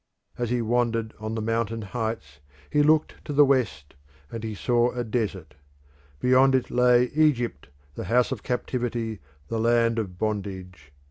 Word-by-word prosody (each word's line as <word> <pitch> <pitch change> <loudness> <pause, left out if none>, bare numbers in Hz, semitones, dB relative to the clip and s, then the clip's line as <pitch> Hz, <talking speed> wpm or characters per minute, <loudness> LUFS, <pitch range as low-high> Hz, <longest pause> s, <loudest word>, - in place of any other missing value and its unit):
As 120 -2 -2
he 120 -1 0
wandered 115 -1 0
on 110 +1 -4
the 110 - -3
mountain 115 0 -1
heights 110 - -4 0.3
he 150 - +3
looked 155 +1 +2
to - - -6
the 145 +1 +6
west 130 - 0 0.4
and 115 -1 -6
he 110 -1 -4
saw 120 +3 +2
a 125 -1 -2
desert: 105 -8 -3 0.7
beyond 130 +1 +4
it 125 -1 -1
lay 125 0 +4
Egypt, 125 - +1 0.2
the - - -6
house 125 +3 +2
of 125 -5 -3
captivity, 120 -3 -3 0.3
the 115 - -2
land 115 0 +2
of 95 -5 -5
bondage. 95 -6 -4
115 Hz, 155 wpm, -25 LUFS, 110-125 Hz, 0.7 s, the